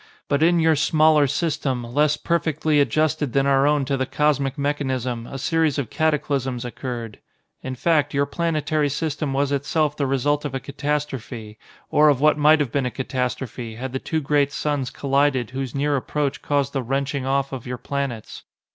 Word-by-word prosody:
But 140 Hz, +1 st, +1 dB
in 170 Hz, +1 st, +4 dB
your 160 Hz, -1 st, +4 dB
smaller 155 Hz, 0 st, +4 dB
system, 145 Hz, -4 st, -1 dB
less 145 Hz, +5 st, +1 dB
perfectly 160 Hz, -3 st, +1 dB
adjusted 150 Hz, +1 st, +1 dB
than 135 Hz, 0 st, +2 dB
our 140 Hz, 0 st, +4 dB
own 145 Hz, -2 st, +2 dB
to 135 Hz, +1 st, 0 dB
the 130 Hz, -1 st, -1 dB
cosmic 145 Hz, -2 st, +1 dB
mechanism, 130 Hz, -5 st, -2 dB
a 135 Hz, -, -6 dB
series 160 Hz, +2 st, +1 dB
of 135 Hz, -6 st, -3 dB
cataclysms 140 Hz, -5 st, 0 dB
occurred. 120 Hz, -2 st, -6 dB, 0.4 s
In 130 Hz, 0 st, -5 dB
fact, 145 Hz, +2 st, +2 dB
your 140 Hz, 0 st, +1 dB
planetary 155 Hz, -1 st, 0 dB
system 150 Hz, 0 st, -2 dB
was 140 Hz, +1 st, 0 dB
itself 145 Hz, +2 st, 0 dB
the 140 Hz, -2 st, -1 dB
result 145 Hz, +2 st, +1 dB
of 145 Hz, -3 st, -4 dB
a -, -, -1 dB
catastrophe, 135 Hz, -6 st, -4 dB, 0.3 s
or 150 Hz, 0 st, +5 dB
of 140 Hz, -3 st, +2 dB
what 150 Hz, +1 st, +4 dB
might 150 Hz, +1 st, +5 dB
have 140 Hz, -5 st, -1 dB
been 135 Hz, -1 st, 0 dB
a -, -, -1 dB
catastrophe, 125 Hz, -2 st, -4 dB
had 130 Hz, +2 st, -6 dB
the 130 Hz, -, -1 dB
two 160 Hz, +3 st, -2 dB
great 145 Hz, 0 st, +2 dB
suns 145 Hz, -3 st, -1 dB
collided 140 Hz, -3 st, +1 dB
whose 130 Hz, -1 st, -4 dB
near 145 Hz, +1 st, +1 dB
approach 140 Hz, +1 st, -2 dB
caused 140 Hz, -1 st, 0 dB
the 135 Hz, -, 0 dB
wrenching 135 Hz, +2 st, -2 dB
off 135 Hz, 0 st, 0 dB
of 130 Hz, -2 st, -6 dB
your 125 Hz, 0 st, -4 dB
planets. 135 Hz, -5 st, -4 dB
140 Hz, 180 wpm, -23 LUFS, 130-150 Hz, 0.4 s, or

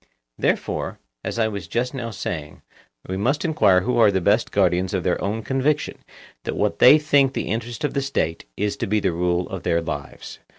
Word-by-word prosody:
Therefore, -, -, -1 dB, 0.3 s
as -, -, -4 dB
I 110 Hz, -1 st, +2 dB
was 100 Hz, -2 st, -5 dB
just 125 Hz, +2 st, -1 dB
now 120 Hz, -4 st, -4 dB
saying, 80 Hz, -8 st, -6 dB, 0.4 s
we 95 Hz, -, -3 dB
must 135 Hz, -, 0 dB
enquire 105 Hz, -, +4 dB
who 120 Hz, +4 st, 0 dB
are 110 Hz, -2 st, +7 dB
the 95 Hz, -1 st, +1 dB
best 105 Hz, +6 st, +2 dB
guardians 90 Hz, -1 st, +1 dB
of 90 Hz, -, -1 dB
their 90 Hz, -, 0 dB
own 110 Hz, +3 st, -2 dB
conviction 140 Hz, +4 st, 0 dB, 0.4 s
that -, -, -3 dB
what -, -, 0 dB
they 135 Hz, +5 st, +9 dB
think 145 Hz, -3 st, +3 dB
the -, -, -3 dB
interest 115 Hz, +5 st, -3 dB
of 150 Hz, -, 0 dB
the 140 Hz, -, 0 dB
State 85 Hz, -, -2 dB
is 105 Hz, 0 st, -1 dB
to -, -, -2 dB
be 105 Hz, +2 st, +2 dB
the 95 Hz, -2 st, 0 dB
rule 90 Hz, +1 st, 0 dB
of 95 Hz, -2 st, -5 dB
their 85 Hz, -, +1 dB
lives. 70 Hz, -4 st, -6 dB
105 Hz, 205 wpm, -23 LUFS, 90-130 Hz, 0.4 s, they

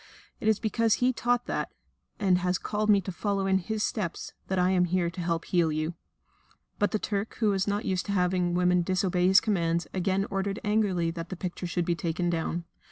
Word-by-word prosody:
It 215 Hz, -, -3 dB
is 220 Hz, -2 st, +3 dB
because 225 Hz, 0 st, +2 dB
He 250 Hz, +1 st, +2 dB
taught 245 Hz, +1 st, 0 dB
that, -, -, -2 dB, 0.5 s
and 190 Hz, -4 st, +3 dB
has 180 Hz, 0 st, 0 dB
called 215 Hz, 0 st, -2 dB
me 200 Hz, -2 st, +6 dB
to 190 Hz, -, -5 dB
follow 195 Hz, +1 st, -1 dB
in 190 Hz, 0 st, +3 dB
His 215 Hz, +3 st, -2 dB
steps, 190 Hz, -7 st, -3 dB
that 190 Hz, -, -1 dB
I 180 Hz, +1 st, +3 dB
am 180 Hz, -1 st, +3 dB
here 175 Hz, -1 st, 0 dB
to 175 Hz, -, -6 dB
help 170 Hz, -1 st, -1 dB
to -, -, -15 dB
heal 170 Hz, -3 st, +3 dB
you." 155 Hz, +2 st, -2 dB, 0.9 s
But 205 Hz, -, +3 dB
the -, -, 0 dB
Turk, 205 Hz, 0 st, -3 dB
who 215 Hz, -3 st, +2 dB
was 195 Hz, 0 st, 0 dB
not 205 Hz, +1 st, -1 dB
used 185 Hz, +1 st, -1 dB
to -, -, -1 dB
having 180 Hz, -2 st, +1 dB
women 180 Hz, 0 st, +3 dB
disobey 180 Hz, 0 st, +1 dB
his 190 Hz, +1 st, +7 dB
commands, 170 Hz, -5 st, 0 dB
again 190 Hz, +1 st, 0 dB
ordered 195 Hz, +1 st, -1 dB
angrily 205 Hz, -6 st, +1 dB
that 165 Hz, 0 st, -6 dB
the 185 Hz, -, -4 dB
picture 180 Hz, 0 st, -5 dB
should 175 Hz, 0 st, -1 dB
be 175 Hz, -, +1 dB
taken 175 Hz, +1 st, -1 dB
down. 170 Hz, +1 st, -2 dB
185 Hz, 220 wpm, -28 LUFS, 175-205 Hz, 0.9 s, his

